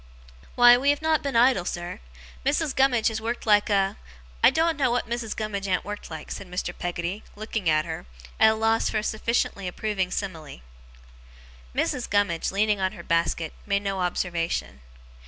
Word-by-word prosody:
'Why, 245 0 +8
we 275 +3 +1
have 290 +2 +1
not 315 -1 +2
been 280 -3 -3
idle, 240 -5 +5
sir. 175 0 -5 0.4
Missis 300 - +1
Gummidge 255 -5 +3
has 220 -1 -4
worked 235 +2 -3
like 210 -1 +4
a 195 -1 +1 0.5
I - - +9
doen't 325 0 +1
know 275 -3 +1
what 245 +1 0
Missis 235 -1 -3
Gummidge 200 -2 -3
an't 185 -1 0
worked 205 0 -6
like,' 160 -2 -8
said 195 - -6
Mr. 180 0 -3
Peggotty, 175 +3 -4
looking 215 -3 -2
at 155 0 +2
her, 160 - -6 0.3
at 220 - +7
a - - -1
loss 225 +1 +2
for - - -1
a 210 - -1
sufficiently 215 -3 -1
approving 190 0 -2
simile. 165 - -5 1.1
Mrs. 250 - -1
Gummidge, 200 -5 +1
leaning 205 +1 +1
on 190 +1 0
her - - -10
basket, 165 -1 0
made 200 0 +1
no 195 -1 -2
observation. 170 - -2
205 Hz, 175 wpm, -25 LUFS, 180-230 Hz, 1.1 s, I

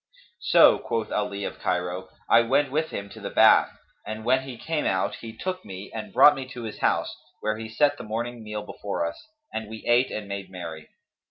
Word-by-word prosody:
"So," - - +6
quoth 115 -1 -3
Ali 100 -1 -2
of - - -5
Cairo: 90 +1 -2 0.2
"I 115 - +6
went 135 +4 +2
with 155 +3 0
him 100 - -5
to - - -11
the - - -5
bath, - - +6 0.3
and 110 +1 -6
when 130 +2 +3
we 125 -3 -7
came 155 +5 -2
out, 95 -2 0
he 115 - -8
took 185 +11 -4
me 95 0 -8
and 110 - -6
brought 150 - +8
me 135 -2 -6
to 125 -2 -8
his 110 - -6
house, - - +1 0.3
where 110 0 -1
he 110 0 -6
set 145 +6 +2
the - - -6
morning 120 +2 -4
meal 105 -1 -5
before 100 -5 -3
us, 85 - -7 0.3
and 110 -1 -4
we 110 0 -9
ate 120 +2 +4
and 105 -1 -5
made 100 -1 -5
merry. 85 -4 -8
110 Hz, 210 wpm, -26 LUFS, 100-125 Hz, 0.3 s, brought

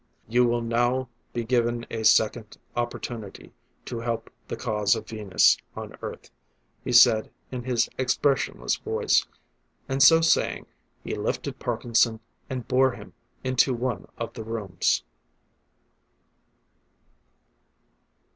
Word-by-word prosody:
"You 120 +2 +3
will 120 0 0
now 120 +2 0 0.2
be 120 - -3
given 120 0 0
a 110 -1 -3
second 110 0 +3 0.2
opportunity 120 -3 -5 0.3
to 120 - -5
help 115 -1 -3 0.2
the - - -4
cause 105 0 +1
of 110 - -7
Venus 105 -4 +3 0.2
on - - -7
Earth," - - -8 0.5
he - - -3
said 120 -3 +6 0.2
in 125 -2 -5
his 125 -2 +1
expressionless 130 +1 +1
voice. - - +1 0.6
And 135 +1 -1
so 165 +4 +8
saying, 165 - +2 0.4
he - - -4
lifted - - -3
Parkinson, 115 -1 +1 0.3
and 130 -2 -5
bore 130 0 +3
him - - -12 0.3
into 130 0 +2
one 120 -5 -3
of 115 - -5
the 115 - -7
rooms. 110 -4 -1
120 Hz, 120 wpm, -26 LUFS, 110-125 Hz, 0.6 s, so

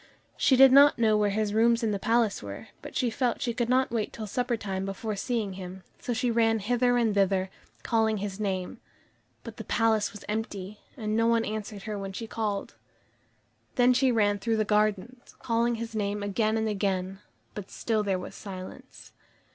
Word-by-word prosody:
She 265 - +3
did 265 0 +8
not 285 +2 +7
know 220 -2 +3
where 210 -1 +2
his 210 0 -1
rooms 230 +2 +3
in 220 - +1
the 200 - -2
palace 225 0 +1
were, 100 -1 -8
but - - -10
she 245 -2 +1
felt 245 0 0
she 245 -4 -1
could 240 0 -1
not 260 0 +2
wait 225 -3 -1
till 220 - -6
supper 245 +3 -1
time 195 -3 -4
before 195 +2 -4
seeing 215 -2 -2
him, 185 0 -8 0.2
so - - -4
she 240 +1 0
ran 225 -1 +3
hither 245 +3 +1
and 230 -3 +2
thither, 195 -1 +1 0.3
calling 220 -2 +1
his 200 0 -5
name. 190 -3 -3 0.6
But - - -9
the - - -6
palace 220 -3 +1
was 205 -1 -11
empty, 210 -2 -4 0.2
and 215 -3 -2
no 230 +1 +3
one 230 -1 +2
answered 210 -2 -5
her 215 -2 -4
when 195 -1 -6
she 225 - -5
called. 210 -3 -3 1.0
Then 250 0 +5
she 255 +1 +3
ran 205 -3 +2
through 225 +2 0
the 215 - +1
gardens, 215 +3 -1
calling 235 0 0
his 230 0 -6
name 205 -1 -2
again 215 +2 0
and 220 0 0
again, 195 -2 -2 0.3
but 205 -2 -7
still 220 -2 -1
there 195 -3 0
was 180 - -7
silence. 185 -2 -10
215 Hz, 195 wpm, -28 LUFS, 200-230 Hz, 1.0 s, did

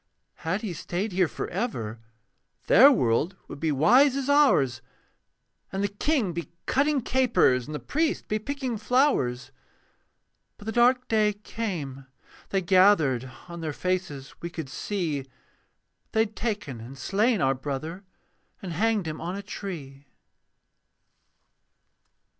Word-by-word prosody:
Had 185 +6 -2
he 200 -5 -3
stayed 180 +6 -3
here 180 -1 +2
for - - -5
ever, 120 - -3 0.7
Their 270 +7 +8
world 145 - +1
would - - -9
be 160 0 0
wise 250 - +5
as 275 0 0
ours 145 - +4 0.9
And 195 +1 -2
the - - +2
king 210 - 0
be 170 0 -5 0.2
cutting 280 +1 +2
capers, 235 - +2
And 150 - -5
the - - -3
priest 310 - -1
be 215 - -1
picking 260 -1 -3
flowers. 220 - +1 1.1
But 205 - -13
the 220 - -2
dark 250 +2 +3
day 215 -2 +2
came: 175 - -5 0.4
they 195 -1 0
gathered: 165 - +4 0.2
On 170 -1 -8
their 155 -2 -3
faces 180 -6 -3
we 170 - -4
could 160 -5 -6
see 160 -4 -2 0.9
They 220 - +4
had 220 -1 -2
taken 205 - -3
and 130 +4 -10
slain 210 - +1
our 135 -2 +3
brother, 145 +7 -5 0.6
And 180 -3 -6
hanged 215 +2 +1
him 155 -1 -5
on 175 +3 -3
a 200 - -6
tree. 145 -9 -7
185 Hz, 135 wpm, -26 LUFS, 145-225 Hz, 1.1 s, Their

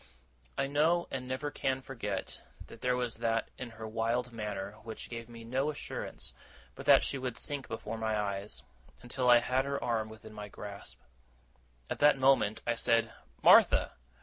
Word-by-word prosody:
I - - +2
know, 155 +5 +2
and 130 -1 -4
never 130 +3 -2
can 135 -1 -1
forget, 105 -8 -4 0.2
that - - -13
there 125 0 +2
was 125 -3 -2
that 115 0 0
in 125 - -5
her 110 -1 -8
wild 115 +3 -1
manner 105 -3 -4
which 110 +1 -8
gave 115 0 -6
me 115 -1 -10
no 130 +5 0
assurance 150 - -5 0.4
but - - -10
that - - +8
she 140 - -1
would 125 -2 -3
sink 145 -2 -2
before 110 0 -5
my 110 -1 0
eyes, 100 0 -3 0.4
until 125 +1 0
I 120 - +9
had 130 +2 +1
her 140 0 -2
arm 110 -2 0
within 110 0 -11
my 105 -1 -7
grasp. 100 0 -9 0.9
At - - -4
the 150 0 +7
same - - -11
moment 130 -5 +3
I 120 - +2
said 115 0 +2 0.3
'Martha! - - +7
120 Hz, 175 wpm, -32 LUFS, 110-130 Hz, 0.9 s, I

